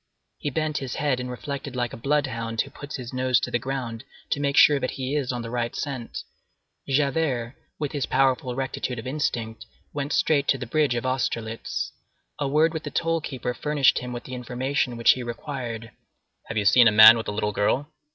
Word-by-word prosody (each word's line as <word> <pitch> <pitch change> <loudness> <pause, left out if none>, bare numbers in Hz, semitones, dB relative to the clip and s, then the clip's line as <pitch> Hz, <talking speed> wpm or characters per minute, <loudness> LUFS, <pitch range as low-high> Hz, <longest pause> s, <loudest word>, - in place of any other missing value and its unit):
He - - -2
bent 155 +2 -1
his 130 -3 -5
head 140 -4 0
and 125 0 -4
reflected 135 +1 -5
like 120 -1 -2
a - - -4
blood 145 +5 +1
hound 115 -3 -4
who - - -7
puts 145 +1 -8
his 125 -2 -7
nose 130 -1 +2
to - - -3
the 120 - +1
ground 125 -3 -4 0.3
to - - +1
make 140 -1 0
sure 145 -2 +7
that 130 - -1
he 135 +2 -2
is 135 -4 0
on 120 -1 -4
the 115 - -6
right 120 -1 -2
scent. 130 -5 -4 0.7
Javert, 135 -3 +1 0.2
with 150 -2 -3
his 145 -4 -2
powerful 130 -1 +1
rectitude 130 -1 -3
of 115 - -6
instinct, 120 -5 -3 0.3
went 145 0 -3
straight 145 -3 +2
to 135 - +3
the 125 - -5
bridge 145 +1 +1
of 120 - -2
Austerlitz. 115 -3 -2 0.5
A 145 - 0
word 155 +4 +3
with 160 - -3
the 150 - -5
toll 165 +1 0
keeper 130 -4 -4
furnished 145 0 +2
him 125 0 -6
with 120 -1 -5
the 130 - -9
information 125 0 -2
which 115 - +6
he 130 - -1
required: 120 -2 -5 0.6
"Have 110 - -4
you 105 - +1
seen 120 +4 +7
a - - +6
man 110 +2 +10
with 115 - -4
a - - -1
little 105 0 -1
girl?" 105 +8 +1
130 Hz, 210 wpm, -25 LUFS, 120-140 Hz, 0.7 s, man